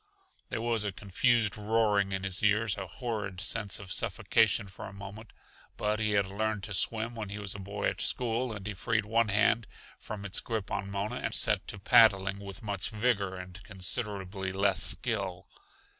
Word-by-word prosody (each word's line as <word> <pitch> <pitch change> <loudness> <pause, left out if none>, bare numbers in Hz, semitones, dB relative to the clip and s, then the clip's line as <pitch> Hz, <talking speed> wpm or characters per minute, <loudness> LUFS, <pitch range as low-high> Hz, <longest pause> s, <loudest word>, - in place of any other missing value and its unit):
There 110 - -3
was 115 -2 +2
a 105 - -1
confused 105 +3 +1
roaring 105 -2 +2
in 95 0 -2
his 95 -1 +1
ears, 105 0 +2
a 95 -1 -5
horrid 105 -2 -4
sense 100 0 -1
of 95 -3 -9
suffocation - - +2
for 95 - -9
a - - -9
moment. 100 +2 -9 0.5
But 105 +1 0
he 110 -1 +1
had 100 -1 +3
learned 105 +1 -2
to 105 - -5
swim 115 +4 0
when 110 -3 -5
he 100 - -5
was 100 -1 -1
a 100 - -7
boy 100 +2 -3
at - - -2
school, 120 0 +1
and 100 -3 -7
he 105 - -3
freed 110 +3 0
one 115 +1 +2
hand 105 +2 +3 0.3
from 100 -2 -7
its 100 - +2
grip 110 -4 -4
on 100 0 -2
Mona 100 +5 -3
and - - -2
set 105 -1 +1
to 105 - -5
paddling 100 -1 +5
with 100 0 -9
much 100 -3 -2
vigor 105 -4 0
and 90 0 -9
considerably 95 -1 -3
less 95 0 +2
skill. 100 -7 +2
105 Hz, 190 wpm, -30 LUFS, 95-110 Hz, 0.5 s, paddling